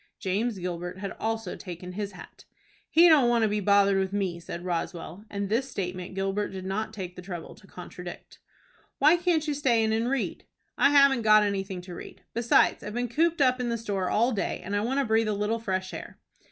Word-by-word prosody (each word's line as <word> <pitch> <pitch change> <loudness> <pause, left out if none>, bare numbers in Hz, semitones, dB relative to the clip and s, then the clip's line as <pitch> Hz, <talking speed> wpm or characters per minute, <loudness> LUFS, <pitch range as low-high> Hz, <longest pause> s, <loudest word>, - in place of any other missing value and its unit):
James 205 +4 -1
Gilbert 175 0 -5
had 195 0 -5
also 225 -3 -2
taken 180 -1 -8
his 200 +2 -4
hat. - - -13 0.4
"He 340 +2 +7
don't 290 -7 +6
want 235 -1 +3
to - - +4
be 210 0 0
bothered 200 -1 +4
with 190 0 -1
me," 190 -4 -2
said 170 +1 -7
Roswell, 175 +2 -4
and 200 -1 -3
this 240 +6 0
statement 180 -2 -5
Gilbert 195 +2 -1
did 190 -1 -7
not 205 +4 -2
take 185 -4 -7
the - - -8
trouble 175 -2 -7
to 200 - -19
contradict. 180 -1 -10 0.6
"Why 300 +4 +6
can't 340 -3 +1
you 300 - +1
stay 255 -6 +2
in 220 0 +1
and 225 +2 0
read?" 270 -2 -2 0.3
"I - - +4
haven't 280 -3 +5
got 215 -1 +6
anything 195 -2 -2
to 180 0 -10
read. - - -10
Besides 235 0 +3
I've 210 +2 -6
been 245 0 -1
cooped 325 +5 +1
up 255 -1 +4
in 245 -1 -1
the 235 - -1
store 200 -5 -2
all 235 +4 +2
day, 205 -5 -2
and 200 +2 -2
I 205 - +1
want 260 +6 0
to 280 - +1
breathe 225 0 +2
a 215 - +1
little 210 +3 -1
fresh 190 -3 -3
air." - - -8
210 Hz, 220 wpm, -27 LUFS, 185-235 Hz, 0.6 s, He